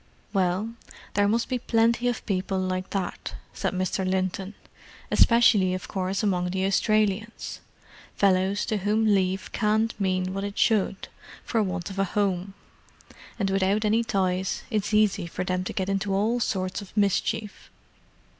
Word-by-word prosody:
"Well, 195 +3 0 0.4
there 205 0 +3
must 230 +3 +1
be 255 -1 -1
plenty 235 +1 +2
of 245 -2 -2
people 190 -1 -1
like 185 0 -2
that," 195 -3 -4 0.2
said - - -1
Mr. 185 +1 -1
Linton. 190 +1 -1 0.6
"Especially, 215 -6 +5
of 185 - -6
course, 190 +1 -2
among 180 -3 +1
the 190 +1 -1
Australians. 215 +2 0 0.6
Fellows 195 0 +2
to 215 - -1
whom 210 +3 +1
leave 190 -2 +1
can't 220 +1 +1
mean 185 -1 0
what 195 0 -3
it 200 0 -5
should, 205 -3 +1 0.4
for 225 - 0
want 190 -1 -3
of 195 - -6
a - - +4
home: 195 -1 -1 0.8
and 195 -3 0
without 195 +3 +1
any 220 +2 +3
ties 190 -3 -1
it's 210 -2 -1
easy 210 -3 +2
for 180 +2 -4
them 185 0 -1
to - - -3
get 190 -3 -2
into 195 0 0
all 220 +5 +1
sorts 190 -3 -1
of 200 +1 -13
mischief. 205 +1 0
195 Hz, 155 wpm, -26 LUFS, 185-215 Hz, 0.8 s, Especially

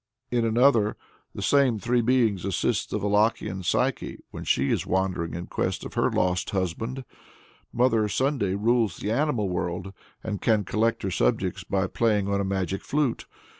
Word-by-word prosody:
In 120 -1 +1
another, 115 -2 +3 0.4
the - - -4
same 135 -5 +3
three 120 +3 +1
beings 115 -6 +2
assist 95 -2 -1
the - - -1
Wallachian 105 -1 +1
Psyche 90 - -1
when - - -7
she 70 +1 +1
is - - -1
wandering 95 -3 -1
in 85 +1 -5
quest - - -2
of - - -8
her - - +2
lost 90 0 0
husband. 110 +8 -3 0.7
Mother 115 -3 +2
Sunday 130 -7 0
rules 110 -2 +1
the 105 - -3
animal 120 -5 +1
world, 90 +1 -3 0.3
and 105 -3 -4
can 110 -3 +2
collect 110 +4 0
her 95 - -1
subjects - - 0
by 95 -1 0
playing 105 0 +1
on 100 0 0
a - - 0
magic 95 -1 -2
flute. 145 -5 -1
105 Hz, 165 wpm, -26 LUFS, 95-120 Hz, 0.7 s, another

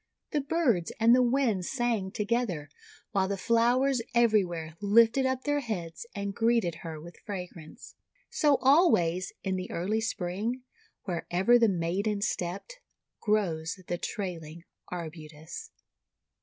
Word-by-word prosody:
The 295 - +1
birds 270 - +1
and 230 +2 +6
the 255 - +4
winds 240 -7 +1
sang 235 -7 0
together, 205 -8 -1 0.4
while 190 -1 +1
the 200 0 -2
flowers 240 +4 +2
everywhere 185 -9 +2
lifted 230 +5 +4
up 260 0 -2
their 290 0 +1
heads 205 - -5
and 200 -1 -3
greeted 225 -7 +1
her 160 -2 -6
with 170 +2 -12
fragrance. 180 -6 -8 0.4
So 295 -3 +3
always 220 - +4
in 190 -1 -1
the 185 - -5
early 205 +6 -1
Spring, 220 +4 -2 0.4
wherever 185 +6 +2
the 230 -2 +5
maiden 195 +4 -1
stepped, 195 - -3 0.4
grows 180 -6 0
the 175 0 -3
Trailing 170 -5 -5 0.3
Arbutus. 160 - -7
200 Hz, 125 wpm, -29 LUFS, 175-240 Hz, 0.4 s, and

